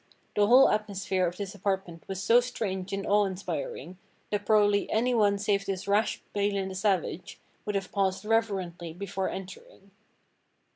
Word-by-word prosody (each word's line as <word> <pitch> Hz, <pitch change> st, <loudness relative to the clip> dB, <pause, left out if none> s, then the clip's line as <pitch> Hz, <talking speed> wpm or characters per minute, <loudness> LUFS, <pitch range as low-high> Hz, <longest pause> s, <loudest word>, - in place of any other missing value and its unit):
The 205 Hz, 0 st, +4 dB
whole 255 Hz, +4 st, +8 dB
atmosphere 195 Hz, -3 st, 0 dB
of 175 Hz, +1 st, -5 dB
this 200 Hz, -2 st, -5 dB
apartment 190 Hz, -4 st, -3 dB
was 195 Hz, 0 st, -4 dB
so 230 Hz, +4 st, +6 dB
strange 200 Hz, -6 st, -3 dB
and 195 Hz, 0 st, -3 dB
awe 205 Hz, 0 st, +3 dB
inspiring 195 Hz, -, -5 dB, 0.3 s
that 205 Hz, -1 st, -2 dB
probably 205 Hz, -2 st, +3 dB
anyone 220 Hz, -3 st, +2 dB
save 200 Hz, -1 st, 0 dB
this 195 Hz, 0 st, -3 dB
rash 205 Hz, +2 st, +1 dB
Balin 200 Hz, -1 st, 0 dB
the -, -, -6 dB
Savage 185 Hz, -3 st, -1 dB, 0.3 s
would 210 Hz, -, -1 dB
have 195 Hz, -1 st, -2 dB
paused 195 Hz, 0 st, 0 dB
reverently 190 Hz, -7 st, -1 dB
before 190 Hz, +1 st, -3 dB
entering. 190 Hz, +1 st, -10 dB
200 Hz, 150 wpm, -28 LUFS, 190-210 Hz, 0.3 s, whole